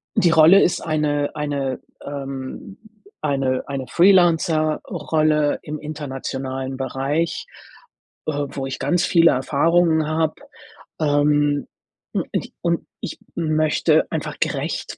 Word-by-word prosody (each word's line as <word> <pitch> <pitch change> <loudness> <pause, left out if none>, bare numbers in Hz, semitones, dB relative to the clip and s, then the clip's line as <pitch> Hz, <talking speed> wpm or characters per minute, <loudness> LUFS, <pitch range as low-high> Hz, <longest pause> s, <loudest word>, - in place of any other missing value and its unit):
die 170 -2 +4
Rolle 165 +5 +7
ist 175 - +1
eine 150 -2 -1
eine 140 -3 -2 0.2
ähm, 140 +5 -7 0.4
eine 135 -3 0
eine 135 -2 -4
Freelancer-Rolle 155 -4 +2
im 150 0 -6
internationalen 135 -3 -5
Bereich, 135 +5 -2 0.8
äh, 155 - 0 0.2
wo 135 - -5
ich 135 - -5
ganz 155 +6 +1
viele 165 -1 +5
Erfahrungen 160 +4 +2
habe. 155 0 0 0.6
Ähm, 145 -1 +2 0.5
u - - +1
ich - - -3
und - - -1
ich - - -6 0.2
möchte 155 -2 +2
einfach - - -4
gerecht - - -2
150 Hz, 110 wpm, -21 LUFS, 135-160 Hz, 0.8 s, Rolle